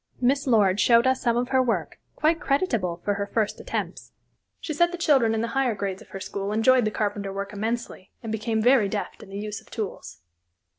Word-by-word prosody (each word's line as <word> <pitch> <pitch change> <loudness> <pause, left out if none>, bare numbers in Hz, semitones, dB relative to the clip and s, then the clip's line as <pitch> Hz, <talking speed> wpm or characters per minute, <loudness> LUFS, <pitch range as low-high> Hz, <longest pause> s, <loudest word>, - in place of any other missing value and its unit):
Miss 275 +3 +1
Lord 205 -5 +3
showed 235 +2 +5
us 260 0 +2
some 235 -1 +1
of 245 +1 -1
her 260 -1 +3
work, 215 -11 -2 0.2
quite 320 +2 +2
creditable 235 - -1
for 205 - +2
her 200 0 -3
first 215 0 -1
attempts. - - -5 0.5
She 310 - -4
said 345 +3 +3
the 350 - -5
children 265 -9 +3
in 220 - 0
the 230 - -2
higher 260 -2 0
grades 195 -2 -4
of - - -16
her 195 - -7
school 200 +1 -4
enjoyed 235 +3 +4
the - - +2
carpenter 205 -1 -2
work 200 +1 -5
immensely 220 -2 -4
and 225 - -4
became 220 0 -1
very 245 -4 +4
deft 205 0 -4
in 195 - -12
the 195 - -7
use 210 0 -5
of - - -22
tools. 90 - -6
220 Hz, 215 wpm, -25 LUFS, 200-255 Hz, 0.5 s, showed